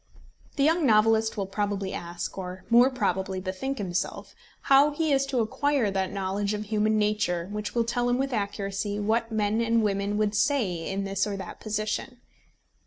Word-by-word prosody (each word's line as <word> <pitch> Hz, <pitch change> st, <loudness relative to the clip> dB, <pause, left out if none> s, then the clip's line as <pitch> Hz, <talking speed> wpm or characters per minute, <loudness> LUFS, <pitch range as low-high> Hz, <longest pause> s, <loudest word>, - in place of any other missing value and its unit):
The 275 Hz, -, +1 dB
young 325 Hz, +3 st, +3 dB
novelist 220 Hz, -2 st, +3 dB
will 200 Hz, -, -1 dB
probably 200 Hz, 0 st, -2 dB
ask, 175 Hz, 0 st, -5 dB
or 185 Hz, -1 st, -6 dB
more 240 Hz, +2 st, +7 dB
probably 190 Hz, -6 st, -1 dB
bethink 190 Hz, +9 st, -4 dB
himself 185 Hz, -4 st, -3 dB, 0.3 s
how 275 Hz, +2 st, +5 dB
he 305 Hz, +1 st, -1 dB
is 275 Hz, 0 st, +2 dB
to 260 Hz, -3 st, +1 dB
acquire 255 Hz, 0 st, +1 dB
that 190 Hz, -1 st, -1 dB
knowledge 200 Hz, +1 st, -1 dB
of 210 Hz, -, -4 dB
human 215 Hz, 0 st, +1 dB
nature 205 Hz, -5 st, 0 dB
which 210 Hz, -3 st, -4 dB
will 235 Hz, -, +3 dB
tell 245 Hz, +1 st, 0 dB
him 245 Hz, -, +2 dB
with 270 Hz, 0 st, -1 dB
accuracy 200 Hz, -1 st, -2 dB
what 225 Hz, +2 st, 0 dB
men 215 Hz, +1 st, +1 dB
and 230 Hz, -1 st, +2 dB
women 200 Hz, 0 st, 0 dB
would 210 Hz, -1 st, +1 dB
say 205 Hz, -, 0 dB
in 195 Hz, +1 st, -2 dB
this 195 Hz, +1 st, -1 dB
or 200 Hz, -1 st, -3 dB
that 190 Hz, -, -8 dB
position. 215 Hz, +4 st, -3 dB
210 Hz, 175 wpm, -27 LUFS, 195-235 Hz, 0.3 s, more